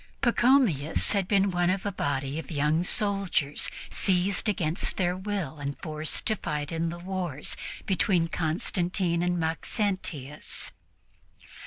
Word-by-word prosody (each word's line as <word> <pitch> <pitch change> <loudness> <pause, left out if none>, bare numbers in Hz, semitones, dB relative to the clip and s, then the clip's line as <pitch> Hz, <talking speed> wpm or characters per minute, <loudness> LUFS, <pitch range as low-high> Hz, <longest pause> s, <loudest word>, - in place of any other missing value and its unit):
Pachomius 240 - +3
had 200 -3 +1
been 200 -1 +3
one 175 0 +2
of 190 +2 0
a 205 - 0
body 140 -4 -2
of 155 - -8
young 150 +1 +2
soldiers 195 -7 +1 0.2
seized 190 +2 +2
against 170 -3 0
their 180 -1 +1
will 185 -6 -3
and 140 -1 -4
forced 155 +1 -2
to 220 - +2
fight 150 -5 -3
in 165 0 0
the 170 - -5
wars 175 -5 -3 0.3
between 185 -3 +2
Constantine 170 +2 0
and 175 0 +1
Maxentius. 160 - -2
175 Hz, 130 wpm, -28 LUFS, 155-195 Hz, 0.3 s, Pachomius